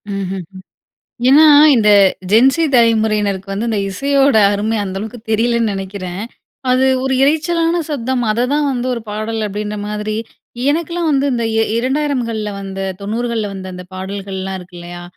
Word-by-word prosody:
ம்ஹ்ம். 190 -1 -4 0.9
ஏன்னா 290 +4 +7 0.3
இந்த 215 -4 +4 0.4
ஜென்சி 265 +9 +5
தலைமுறையினருக்கு 215 -4 +2
வந்து 215 +4 -2
இந்த 215 - 0
இசையோட 275 +5 +2 0.2
அருமை 215 +2 -1
அந்த 190 -1 -5
அளவுக்கு 220 +4 -7
தெரியலைன்னு 230 0 +1
நினைக்கிறேன். 190 -1 -5 0.5
அது 255 +1 +3 0.2
ஒரு 265 - 0
இரைச்சலான 330 +3 +1
சப்தம். 260 -3 -2
அததான் 265 +6 0
வந்து 250 -1 -3
ஒரு 235 - -5
பாடல் 215 +2 -3
அப்படின்ற 210 +1 -4
மாதிரி, 210 0 -3 0.5
எனக்கெலாம் 335 +2 -1
வந்து 280 -1 +2
இந்த 235 -2 -1
இ - - 0 0.2
2000கள்ல 250 -5 -1
வந்த 195 0 -6 0.2
90கள்ல 225 +1 -2
வந்த 190 -1 -7
அந்த 180 0 -8
பாடல்கள்லாம் 190 0 -5
இருக்கு 180 0 -13
இல்லையா? 175 0 -9
220 Hz, 140 wpm, -17 LUFS, 200-260 Hz, 0.9 s, ஏன்னா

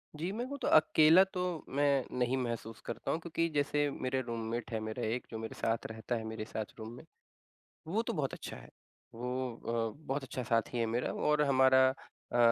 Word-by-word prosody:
जी, 170 +5 -2
मैं 235 +4 -3
वो 280 +2 -5
तो - - 0
अकेला 155 +3 +7
तो 180 -3 -2
मैं 140 -2 +3
नहीं 125 +2 +2
महसूस 115 -3 -3
करता 115 -1 -3
हूँ। 160 - 0
क्योंकि 165 0 -1
जैसे 145 0 +2
मेरे 130 +1 0
रूममेट 115 -1 -4
है 110 - -1
मेरा 110 +2 -4
एक 120 +3 -2
जो 110 - -4
मेरे 110 0 -6
साथ 115 0 -1
रहता 110 +2 -3
है 115 - -3
मेरे 110 -1 -4
साथ 110 0 -3
रूम 110 +1 -6
में - - -11 0.8
वो 205 +7 +1
तो 230 0 -3
बहुत 145 -7 -1
अच्छा - - -6
है। - - -13 0.5
वो 125 0 -3 0.4
अ, 155 - -18
बहुत 135 +1 -1
अच्छा 125 0 -4
साथी 115 +2 0
है 115 - +2
मेरा। 115 +2 -1
और 150 0 +2
हमारा 130 -1 +6 0.5
अ, - - +2
130 Hz, 200 wpm, -33 LUFS, 115-150 Hz, 0.8 s, अकेला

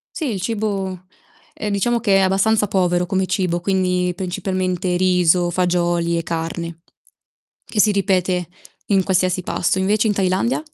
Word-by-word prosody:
Sì 290 -8 -2
il 190 - -4
cibo, 195 -4 -3 0.5
ehm, 210 - -4
diciamo 235 +4 +1
che 200 -4 +3
è - - +4
abbastanza 200 +3 +2
povero 180 -2 +1
come 190 0 0
cibo, 180 -2 -1
quindi 180 -1 0
principalmente 185 -1 -2
riso, 180 -1 +3
fagioli 175 -1 0
e - - -2
carne. 165 0 -4 0.8
Che 210 - -1
si 210 - +4
ripete 185 -3 0 0.4
in 195 -2 +3
qualsiasi 185 -1 +1
pasto. 180 +2 -1
Invece 210 +3 +2
in - - +2
Thailandia, 195 +7 0
185 Hz, 145 wpm, -20 LUFS, 180-195 Hz, 0.8 s, è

